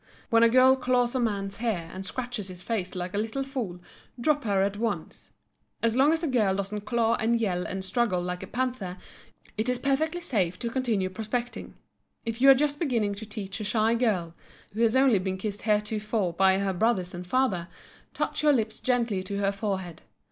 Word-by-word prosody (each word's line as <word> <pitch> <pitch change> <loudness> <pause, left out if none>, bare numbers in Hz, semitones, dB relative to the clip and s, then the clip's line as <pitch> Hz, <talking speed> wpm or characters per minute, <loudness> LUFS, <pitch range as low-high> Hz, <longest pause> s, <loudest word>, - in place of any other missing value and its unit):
When 230 0 +5
a 230 - +7
girl 255 +2 +6
claws 250 -2 +1
a 260 - 0
man's 200 -4 -1
hair 200 -8 -2
and 190 - -6
scratches 240 0 -4
his 180 -1 -10
face 195 -6 -3
like 180 0 -4
a 205 - 0
little 225 +6 -2
fool 245 -10 -4 0.4
drop 290 +2 +1
her 195 -2 +2
at 200 +1 -1
once. 225 +1 -4 0.5
As 230 0 +2
long 275 +4 +5
as 325 0 +1
the 335 - -1
girl 215 -8 +2
doesn't 200 +1 -4
claw 230 0 +2
and 230 +1 +1
yell 180 -5 -1
and 190 0 -4
struggle 200 -1 +1
like 180 0 -3
a - - -7
panther, 245 -8 -3 0.6
it 225 +3 +1
is 250 - +1
perfectly 310 +6 0
safe 195 - -1
to 235 +3 -3
continue 225 -7 0
prospecting. 225 +4 -4 0.5
If 230 +1 -4
you 275 - +8
are 270 - +10
just 290 +1 0
beginning 230 -10 0
to 210 +2 -8
teach 200 -1 -6
a - - -3
shy 215 +2 +2
girl, 205 -9 0 0.4
who 220 - -2
has 230 +1 +3
only 260 -6 +5
been 190 0 -2
kissed 205 +1 -4
heretofore 210 -2 0
by 190 +2 +4
her 195 -1 0
brothers 185 -2 +1
and 175 0 -7
father, 195 -7 +1 0.5
touch - - -1
your 300 -1 +5
lips 220 -4 0
gently 235 -6 +1
to 200 +2 -4
her 200 0 +1
forehead. 195 -4 -4
220 Hz, 200 wpm, -27 LUFS, 190-245 Hz, 0.6 s, are